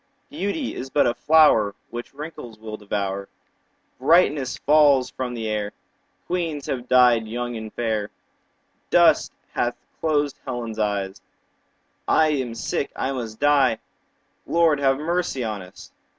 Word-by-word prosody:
Beauty 265 Hz, 0 st, -3 dB
is 130 Hz, -, -6 dB
but 145 Hz, -, +3 dB
a 120 Hz, -, +2 dB
flower 150 Hz, -10 st, +4 dB
15 -, -, -44 dB
Which 120 Hz, +3 st, -7 dB
wrinkles 145 Hz, -7 st, -8 dB
will 110 Hz, 0 st, -7 dB
devour; 100 Hz, -2 st, -3 dB, 0.7 s
Brightness 145 Hz, -2 st, +3 dB
falls 140 Hz, -4 st, +4 dB
from 125 Hz, +1 st, -4 dB
the 115 Hz, -1 st, -4 dB
air; 105 Hz, -1 st, -2 dB, 0.5 s
Queens 165 Hz, -5 st, -2 dB
have 125 Hz, -2 st, -4 dB
died 120 Hz, -3 st, +5 dB
young 120 Hz, +2 st, -4 dB
and 110 Hz, -1 st, -6 dB
fair; 110 Hz, -3 st, -2 dB, 0.8 s
Dust -, -, +4 dB, 0.2 s
hath 120 Hz, 0 st, -1 dB, 0.2 s
closed 150 Hz, -3 st, 0 dB
Helen's 120 Hz, -4 st, -5 dB
eye; 100 Hz, -2 st, -1 dB, 0.9 s
I 155 Hz, -1 st, +4 dB
am 130 Hz, -6 st, -2 dB
sick, 115 Hz, +4 st, -2 dB
I 135 Hz, -, -2 dB
must 115 Hz, -5 st, -5 dB
die— 140 Hz, -5 st, +4 dB, 0.7 s
20 -, -, -3 dB
Lord, 160 Hz, -4 st, +4 dB
have 135 Hz, -1 st, +2 dB
mercy 165 Hz, -3 st, -1 dB
on 105 Hz, -3 st, -3 dB
us! 90 Hz, +1 st, -13 dB
125 Hz, 140 wpm, -23 LUFS, 110-145 Hz, 0.9 s, died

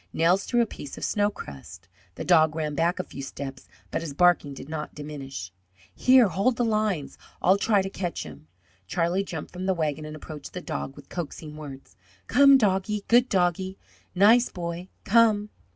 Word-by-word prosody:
Nels 175 Hz, +4 st, +2 dB
threw 240 Hz, -1 st, +2 dB
a -, -, +3 dB
piece 145 Hz, -9 st, -9 dB
of -, -, -3 dB
snow 205 Hz, 0 st, +1 dB
crust. 80 Hz, -, -10 dB, 0.3 s
The -, -, -6 dB
dog 160 Hz, -3 st, +4 dB
ran 155 Hz, -2 st, -2 dB
back 165 Hz, +4 st, +1 dB
a 185 Hz, -, -2 dB
few 140 Hz, -, -9 dB
steps, 135 Hz, -1 st, -7 dB, 0.2 s
but -, -, -1 dB
his 155 Hz, -4 st, -6 dB
barking 175 Hz, -4 st, +3 dB
did 135 Hz, -, -9 dB
not 155 Hz, -1 st, -5 dB
diminish. 135 Hz, -11 st, -7 dB, 0.4 s
"Here, 255 Hz, -, +5 dB
hold 200 Hz, +7 st, +1 dB
the 240 Hz, -, 0 dB
lines. 215 Hz, -9 st, -1 dB, 0.2 s
I'll 190 Hz, +3 st, +4 dB
try 205 Hz, -2 st, +3 dB
to 195 Hz, -, -4 dB
catch 180 Hz, -4 st, -4 dB
'im." 75 Hz, 0 st, -12 dB, 0.4 s
Charlie 175 Hz, -, 0 dB
jumped 160 Hz, -5 st, -7 dB
from 185 Hz, +1 st, -4 dB
the 190 Hz, -, +2 dB
wagon 155 Hz, -2 st, -2 dB
and 155 Hz, 0 st, -7 dB
approached 155 Hz, 0 st, -9 dB
the 180 Hz, -, -4 dB
dog 155 Hz, -5 st, -5 dB
with -, -, -14 dB
coaxing 155 Hz, -2 st, -6 dB
words: 135 Hz, -9 st, -10 dB, 0.3 s
"Come, 275 Hz, +1 st, +7 dB
doggie, 205 Hz, -2 st, 0 dB
good 245 Hz, +2 st, +5 dB
doggie, 185 Hz, +1 st, 0 dB, 0.4 s
nice 220 Hz, +6 st, +5 dB
boy, 170 Hz, 0 st, -5 dB, 0.2 s
come!" 215 Hz, -1 st, +4 dB
175 Hz, 185 wpm, -26 LUFS, 150-205 Hz, 0.4 s, Come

